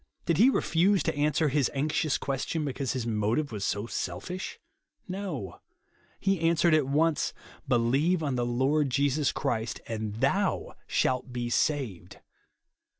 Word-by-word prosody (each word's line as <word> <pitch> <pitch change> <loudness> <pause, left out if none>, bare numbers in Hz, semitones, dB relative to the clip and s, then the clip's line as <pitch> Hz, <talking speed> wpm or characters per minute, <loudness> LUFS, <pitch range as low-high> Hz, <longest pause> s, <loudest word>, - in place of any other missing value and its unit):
Did 170 -3 +1
he 240 +5 +7
refuse 190 -4 +2
to 160 - -1
answer 150 +1 +2
his 140 -1 +2
anxious 150 +1 +1
question, 140 +3 -2
because 135 -1 -2
his 130 -3 -3
motive 115 +6 0
was 105 -3 -4
so 100 +1 -1
selfish? 115 - -5 0.5
No. 180 - -5 0.6
He 195 -2 +1
answered 165 0 +3
at 155 -4 +3
once, 150 +2 +1 0.2
" - - -22
Believe 135 +8 +2
on 140 -3 0
the 120 -1 0
Lord 135 +5 +1
Jesus 140 +2 +1
Christ, 110 -1 -2
and 110 -2 -4
THOU 115 - 0
shalt 130 0 0
be 120 -1 -3
saved." 130 - -1
140 Hz, 145 wpm, -28 LUFS, 120-160 Hz, 0.6 s, he